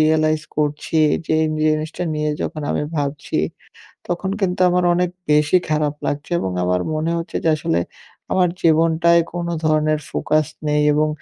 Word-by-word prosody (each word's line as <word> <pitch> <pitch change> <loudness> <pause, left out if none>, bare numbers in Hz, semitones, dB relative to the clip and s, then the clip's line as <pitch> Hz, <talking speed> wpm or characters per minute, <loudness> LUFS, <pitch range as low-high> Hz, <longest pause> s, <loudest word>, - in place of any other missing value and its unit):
realise 155 0 +2
করছি, 150 +1 -1 0.3
যে - - -1
এই 155 - 0 0.2
জিনিসটা 155 +3 -2
নিয়ে 150 0 -1
যখন 155 - -4
আমি - - 0
ভাবছি, 145 0 -2 0.7
তখন 185 +2 -2
কিন্তু 180 -1 -1
আমার 180 0 +2
অনেক 180 0 +1 0.2
বেশি 150 +4 +4
খারাপ 150 -1 0
লাগছে 145 +4 -3
এবং 95 - -2
আমার 90 0 +1
মনে 155 +2 -1
হচ্ছে 165 0 -5
যে, 165 - +3
আসলে 85 - 0 0.5
আমার 180 -2 +3
জীবনটায় 165 +1 +4
কোনো 170 0 -2
ধরনের 155 0 +2
ফোকাস 155 -1 +1 0.2
নেই 150 0 +2
এবং 155 +1 +2
155 Hz, 155 wpm, -20 LUFS, 150-170 Hz, 0.7 s, বেশি